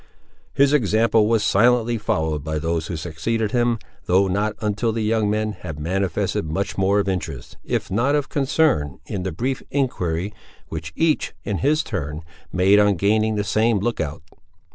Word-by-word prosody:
His 140 Hz, +1 st, +3 dB
example 110 Hz, -3 st, +3 dB
was 110 Hz, -2 st, +2 dB
silently 120 Hz, +3 st, +3 dB
followed 80 Hz, -9 st, -1 dB
by 80 Hz, 0 st, -2 dB
those 80 Hz, +1 st, -1 dB
who 85 Hz, -, -4 dB
succeeded 100 Hz, +7 st, -2 dB
him, 120 Hz, -1 st, +2 dB, 0.3 s
though 95 Hz, +2 st, +4 dB
not 100 Hz, +3 st, 0 dB
until 105 Hz, +2 st, 0 dB
the 110 Hz, 0 st, -2 dB
young 110 Hz, -1 st, +1 dB
men 110 Hz, +1 st, 0 dB
had 80 Hz, -7 st, -8 dB
manifested 90 Hz, +1 st, -1 dB
much 100 Hz, +4 st, -2 dB
more 100 Hz, +1 st, +2 dB
of 100 Hz, -, 0 dB
interest, 90 Hz, -4 st, -4 dB
if -, -, -2 dB
not 125 Hz, +9 st, +2 dB
of 145 Hz, -2 st, 0 dB
concern 135 Hz, -, +1 dB
in 95 Hz, -, -4 dB
the 95 Hz, 0 st, -3 dB
brief 125 Hz, +11 st, -2 dB
enquiry, 100 Hz, -, -1 dB, 0.4 s
which 80 Hz, -1 st, -5 dB
each, 160 Hz, -2 st, +1 dB
in 100 Hz, -3 st, -2 dB
his 155 Hz, +3 st, +2 dB
turn, 75 Hz, -, -4 dB, 0.3 s
made 95 Hz, +3 st, +4 dB
on 105 Hz, -1 st, +4 dB
gaining 110 Hz, +4 st, +2 dB
the 105 Hz, -, 0 dB
same 110 Hz, +2 st, +2 dB
look 115 Hz, +4 st, -1 dB
out. 75 Hz, 0 st, -5 dB
105 Hz, 170 wpm, -22 LUFS, 90-115 Hz, 0.4 s, though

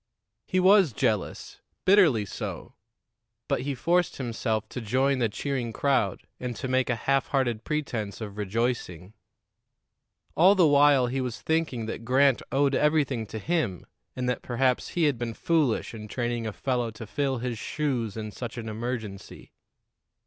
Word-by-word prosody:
He 185 Hz, -, +1 dB
was 190 Hz, -, +5 dB
jealous 105 Hz, -1 st, -2 dB, 0.2 s
bitterly 170 Hz, -, +5 dB
so; -, -, -6 dB, 0.7 s
but -, -, 0 dB
he 140 Hz, +1 st, -3 dB
forced 175 Hz, +7 st, +1 dB
himself 115 Hz, -3 st, -2 dB
to 125 Hz, -, -5 dB
join 130 Hz, +5 st, +1 dB
the 115 Hz, -2 st, +2 dB
cheering 125 Hz, +1 st, -3 dB
crowd 130 Hz, -6 st, +1 dB, 0.2 s
and 125 Hz, -1 st, -4 dB
to 130 Hz, -, -4 dB
make 130 Hz, 0 st, +1 dB
a 125 Hz, -, +2 dB
half 135 Hz, +3 st, +1 dB
hearted 120 Hz, -5 st, 0 dB
pretense 120 Hz, -10 st, -3 dB
of 105 Hz, -3 st, -6 dB
rejoicing. 105 Hz, -3 st, -2 dB, 1.2 s
All 185 Hz, +5 st, +6 dB
the 180 Hz, -3 st, +5 dB
while 145 Hz, -3 st, +5 dB
he 130 Hz, +2 st, -2 dB
was 125 Hz, -2 st, -4 dB
thinking 160 Hz, -8 st, -1 dB
that 115 Hz, +1 st, -5 dB
Grant 130 Hz, +2 st, +3 dB
owed 140 Hz, 0 st, +2 dB
everything 140 Hz, -7 st, +1 dB
to 110 Hz, -, -6 dB
him, 115 Hz, -, -1 dB, 0.3 s
and 125 Hz, -1 st, -2 dB
that 125 Hz, -2 st, -1 dB
perhaps 125 Hz, +1 st, 0 dB
he 170 Hz, -, +3 dB
had 145 Hz, -6 st, +2 dB
been 115 Hz, -2 st, -3 dB
foolish 155 Hz, -11 st, +1 dB
in 105 Hz, -1 st, -8 dB
training 120 Hz, 0 st, -2 dB
a -, -, -2 dB
fellow 125 Hz, +1 st, -1 dB
to 115 Hz, +1 st, -9 dB
fill 130 Hz, +6 st, -1 dB
his 120 Hz, -2 st, -4 dB
shoes 125 Hz, -9 st, -2 dB
in 110 Hz, -1 st, -5 dB
such 120 Hz, +2 st, -7 dB
an 115 Hz, -1 st, -5 dB
emergency. 110 Hz, -3 st, -6 dB
125 Hz, 160 wpm, -27 LUFS, 110-140 Hz, 1.2 s, All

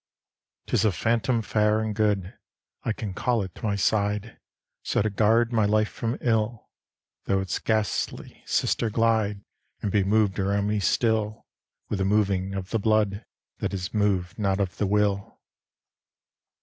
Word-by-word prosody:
XV -, -, -66 dB
'Tis -, -, +3 dB
a 105 Hz, -, +4 dB
phantom 115 Hz, +5 st, +1 dB
fair 105 Hz, 0 st, +2 dB
and 110 Hz, -1 st, -2 dB
good 105 Hz, -3 st, 0 dB, 0.5 s
I -, -, 0 dB
can 105 Hz, -2 st, -4 dB
call 120 Hz, +3 st, 0 dB
it 95 Hz, -, -8 dB
to -, -, -15 dB
my 105 Hz, -2 st, +1 dB
side, 105 Hz, +2 st, 0 dB, 0.4 s
So -, -, 0 dB
to 110 Hz, -, 0 dB
guard 115 Hz, +3 st, +3 dB
my 110 Hz, -2 st, +3 dB
life 110 Hz, +1 st, +2 dB
from 115 Hz, +1 st, -3 dB
ill, 110 Hz, -1 st, 0 dB, 0.5 s
Tho' 95 Hz, -, +1 dB
its 95 Hz, -1 st, -2 dB
ghastly 110 Hz, -2 st, -2 dB
sister 115 Hz, -, +1 dB
glide 110 Hz, -2 st, +1 dB, 0.4 s
And 100 Hz, -, 0 dB
be 100 Hz, -1 st, +3 dB
moved 105 Hz, 0 st, +2 dB
around 100 Hz, +1 st, +1 dB
me 105 Hz, 0 st, 0 dB
still 110 Hz, +1 st, 0 dB, 0.4 s
With 105 Hz, -, -2 dB
the 95 Hz, -, +1 dB
moving 100 Hz, -2 st, +1 dB
of 95 Hz, -1 st, -5 dB
the 115 Hz, -, +1 dB
blood 110 Hz, -1 st, +1 dB, 0.4 s
That -, -, -2 dB
is 90 Hz, -2 st, -5 dB
moved 100 Hz, -4 st, 0 dB
not 100 Hz, -1 st, +1 dB
of 95 Hz, -3 st, -2 dB
the 105 Hz, -, 0 dB
will. 100 Hz, -1 st, 0 dB
105 Hz, 160 wpm, -26 LUFS, 100-110 Hz, 0.5 s, a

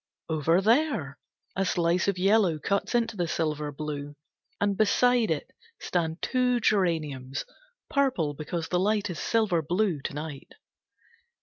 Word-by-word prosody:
Over 160 Hz, +3 st, +2 dB
there, 225 Hz, -, +1 dB, 0.4 s
a 195 Hz, -, +1 dB
slice 175 Hz, -1 st, +1 dB
of 200 Hz, -2 st, +1 dB
yellow 195 Hz, -3 st, +3 dB
cuts 200 Hz, +9 st, -1 dB
into 230 Hz, -2 st, +1 dB
the 175 Hz, -3 st, -1 dB
silver 150 Hz, -2 st, -2 dB
blue, 145 Hz, 0 st, -5 dB, 0.4 s
and 205 Hz, -1 st, +1 dB
beside 235 Hz, +3 st, +3 dB
it 155 Hz, -3 st, -2 dB, 0.3 s
stand 165 Hz, -2 st, -2 dB
two 250 Hz, -1 st, +2 dB
geraniums, 155 Hz, -, 0 dB, 0.4 s
purple 255 Hz, -, +1 dB
because 160 Hz, +3 st, -4 dB
the 180 Hz, -, +1 dB
light 205 Hz, 0 st, +1 dB
is 170 Hz, -, -6 dB
silver 215 Hz, -7 st, +1 dB
blue, 175 Hz, 0 st, 0 dB
to -, -, -4 dB
night. 150 Hz, -2 st, -7 dB
175 Hz, 135 wpm, -27 LUFS, 155-215 Hz, 0.4 s, yellow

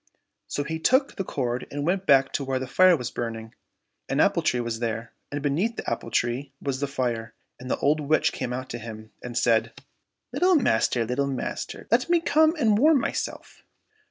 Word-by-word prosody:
So 145 Hz, -, -2 dB
he 160 Hz, +2 st, -4 dB
took 260 Hz, -, +2 dB
the 195 Hz, -, -2 dB
cord 125 Hz, -7 st, -3 dB
and 145 Hz, 0 st, -4 dB
went 185 Hz, +3 st, 0 dB
back 135 Hz, -2 st, +5 dB
to 140 Hz, -, -1 dB
where 135 Hz, -1 st, -1 dB
the 130 Hz, -, -3 dB
fire 180 Hz, +7 st, +5 dB
was 125 Hz, -3 st, -5 dB
burning. 115 Hz, -1 st, -5 dB, 0.6 s
An -, -, 0 dB
apple -, -, +3 dB
tree 125 Hz, -, +1 dB
was 115 Hz, -1 st, -3 dB
there, 115 Hz, -1 st, -3 dB, 0.2 s
and 145 Hz, 0 st, -4 dB
beneath 175 Hz, +11 st, 0 dB
the -, -, -6 dB
apple 115 Hz, 0 st, -3 dB
tree 120 Hz, +4 st, -1 dB
was 135 Hz, -2 st, -3 dB
the 140 Hz, -, -1 dB
fire, 120 Hz, -5 st, -3 dB, 0.2 s
and 125 Hz, +1 st, -8 dB
the -, -, 0 dB
old 150 Hz, +2 st, +2 dB
witch 150 Hz, +1 st, +2 dB
came 125 Hz, -, -4 dB
out 130 Hz, +1 st, -4 dB
to 120 Hz, -, -5 dB
him 110 Hz, -1 st, -9 dB
and 120 Hz, -1 st, -6 dB
said, 115 Hz, -2 st, +2 dB, 0.3 s
" -, -, -57 dB
Little 365 Hz, 0 st, +3 dB
master! 115 Hz, -, +2 dB
little 130 Hz, +4 st, -1 dB
master! 135 Hz, -2 st, -5 dB
let 250 Hz, +7 st, +2 dB
me 345 Hz, 0 st, +4 dB
come 315 Hz, 0 st, +3 dB
and 220 Hz, -9 st, +2 dB
warm 300 Hz, +2 st, +5 dB
myself." -, -, -4 dB
135 Hz, 205 wpm, -25 LUFS, 120-180 Hz, 0.6 s, back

